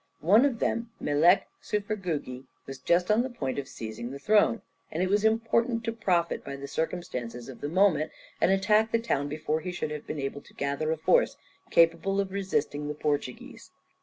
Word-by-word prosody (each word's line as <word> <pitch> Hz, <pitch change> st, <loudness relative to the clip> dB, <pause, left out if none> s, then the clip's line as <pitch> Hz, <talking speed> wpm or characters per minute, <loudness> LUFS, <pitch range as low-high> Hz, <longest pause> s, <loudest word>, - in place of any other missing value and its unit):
One 210 Hz, -, +6 dB
of 265 Hz, -5 st, 0 dB
them, 230 Hz, +1 st, -1 dB
Melek 160 Hz, +6 st, +4 dB, 0.2 s
Çufergugi, 180 Hz, -, -3 dB, 0.2 s
was 135 Hz, -1 st, -8 dB
just 175 Hz, +6 st, +2 dB
on 215 Hz, +2 st, +4 dB
the 260 Hz, -, -2 dB
point 140 Hz, -, -3 dB
of 135 Hz, -, -5 dB
seizing 115 Hz, -1 st, -6 dB
the 135 Hz, -, -6 dB
throne, 210 Hz, +8 st, +3 dB, 0.3 s
and 165 Hz, +4 st, -1 dB
it 185 Hz, -, 0 dB
was 205 Hz, +1 st, +2 dB
important 230 Hz, +1 st, +2 dB
to 230 Hz, -, -1 dB
profit 180 Hz, -7 st, 0 dB
by 140 Hz, -, -6 dB
the 140 Hz, 0 st, -7 dB
circumstances 125 Hz, -8 st, -4 dB
of 130 Hz, -3 st, -10 dB
the 145 Hz, -, -3 dB
moment, 160 Hz, -4 st, +3 dB, 0.3 s
and -, -, +4 dB
attack 210 Hz, +3 st, +3 dB
the -, -, +3 dB
town 145 Hz, -11 st, -1 dB
before 155 Hz, +1 st, -1 dB
he 180 Hz, +3 st, -5 dB
should 175 Hz, -3 st, -3 dB
have 150 Hz, -1 st, -6 dB
been -, -, -4 dB
able 140 Hz, 0 st, -4 dB
to -, -, -20 dB
gather 140 Hz, +3 st, -1 dB
a 160 Hz, -, 0 dB
force 160 Hz, -, +3 dB, 0.3 s
capable 170 Hz, +4 st, +3 dB
of 195 Hz, -1 st, -1 dB
resisting 150 Hz, -7 st, -1 dB
the 150 Hz, -, -3 dB
Portuguese. 145 Hz, -4 st, -3 dB
170 Hz, 190 wpm, -28 LUFS, 145-205 Hz, 0.3 s, One